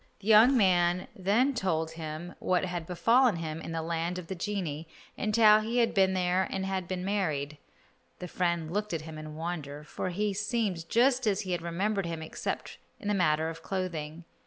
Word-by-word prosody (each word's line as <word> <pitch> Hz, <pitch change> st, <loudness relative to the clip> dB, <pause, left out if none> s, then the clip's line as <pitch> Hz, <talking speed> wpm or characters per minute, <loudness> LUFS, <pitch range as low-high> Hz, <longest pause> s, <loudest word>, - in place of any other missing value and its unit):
The 205 Hz, +2 st, -5 dB
young 225 Hz, +5 st, +7 dB
man 180 Hz, -3 st, +3 dB
then 215 Hz, +9 st, +2 dB
told 165 Hz, -8 st, -1 dB
him 160 Hz, +2 st, -6 dB
what 185 Hz, 0 st, +1 dB
had 175 Hz, -3 st, -4 dB
befallen 230 Hz, +5 st, +3 dB
him 160 Hz, -1 st, -4 dB
in -, -, -6 dB
the 165 Hz, -1 st, -2 dB
land 170 Hz, +2 st, -2 dB
of 180 Hz, -, -6 dB
the 190 Hz, -, -5 dB
genii, 170 Hz, -5 st, -3 dB, 0.3 s
and 215 Hz, +1 st, -1 dB
how 215 Hz, -2 st, +7 dB
he 225 Hz, +3 st, -2 dB
had 235 Hz, -1 st, +3 dB
been 190 Hz, -2 st, +3 dB
there 180 Hz, +1 st, +1 dB
and 190 Hz, 0 st, -2 dB
had 190 Hz, -2 st, -2 dB
been 185 Hz, 0 st, -3 dB
married. 150 Hz, -8 st, -1 dB, 0.6 s
The 180 Hz, -, -6 dB
friend 170 Hz, -2 st, -1 dB
looked 210 Hz, -1 st, -2 dB
at 160 Hz, -, -3 dB
him 155 Hz, 0 st, -8 dB
in 155 Hz, 0 st, -8 dB
wonder, 155 Hz, -3 st, -5 dB
for 170 Hz, -, -4 dB
he 205 Hz, +3 st, -1 dB
seemed 205 Hz, -5 st, -2 dB
just 245 Hz, 0 st, +3 dB
as 200 Hz, -2 st, +2 dB
he 185 Hz, -, -5 dB
had 175 Hz, -2 st, -1 dB
remembered 190 Hz, +3 st, -1 dB
him 165 Hz, -1 st, -4 dB
except 160 Hz, -, -5 dB, 0.2 s
in 205 Hz, -, -4 dB
the -, -, +2 dB
matter 160 Hz, -4 st, +2 dB
of 165 Hz, 0 st, -6 dB
clothing. 170 Hz, -4 st, -4 dB
180 Hz, 200 wpm, -29 LUFS, 165-205 Hz, 0.6 s, young